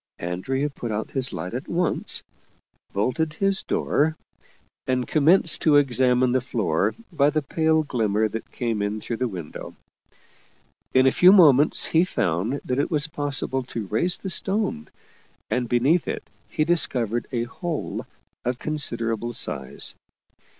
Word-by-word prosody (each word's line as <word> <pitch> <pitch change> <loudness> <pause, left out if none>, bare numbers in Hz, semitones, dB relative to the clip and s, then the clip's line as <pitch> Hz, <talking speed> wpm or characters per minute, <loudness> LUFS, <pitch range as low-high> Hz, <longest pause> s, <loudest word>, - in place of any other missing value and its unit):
Andrea 95 +12 -2
put 120 -4 -6
out 110 +1 -3
his 130 -2 +1
light 90 +1 -5
at 125 +3 -5
once, 175 -1 -1 0.7
bolted 130 +10 -1
his 195 +3 +1
door, 155 +2 0 0.7
and 125 -1 0
commenced 160 +3 +4
to 155 -2 +4
examine 130 -2 +3
the 130 +1 +2
floor 105 - 0 0.2
by 145 -2 +3
the 155 0 -1
pale 160 +2 +1
glimmer 110 -6 0
that 115 +1 -7
came 115 -4 -2
in 105 +1 -2
through 115 +2 -4
the 125 - 0
window. 90 -8 -8 1.2
In 130 0 +6
a 130 - +5
few 180 +6 +6
moments 150 -7 +6
he 165 +1 +3
found 110 - -1
that 125 +1 -1
it 145 - 0
was 150 -4 0
possible 145 -4 -2
to 115 -4 -5
raise 115 - +1
the 190 - -3
stone, 190 - -1 0.6
and 125 -2 -1
beneath 135 +8 +2
it - - -3 0.3
he 155 - 0
discovered 120 -9 0
a 120 -3 -1
hole 160 +6 -5 0.4
of 125 0 -1
considerable 120 -6 -2
size. 65 - -1
130 Hz, 145 wpm, -24 LUFS, 115-155 Hz, 1.2 s, In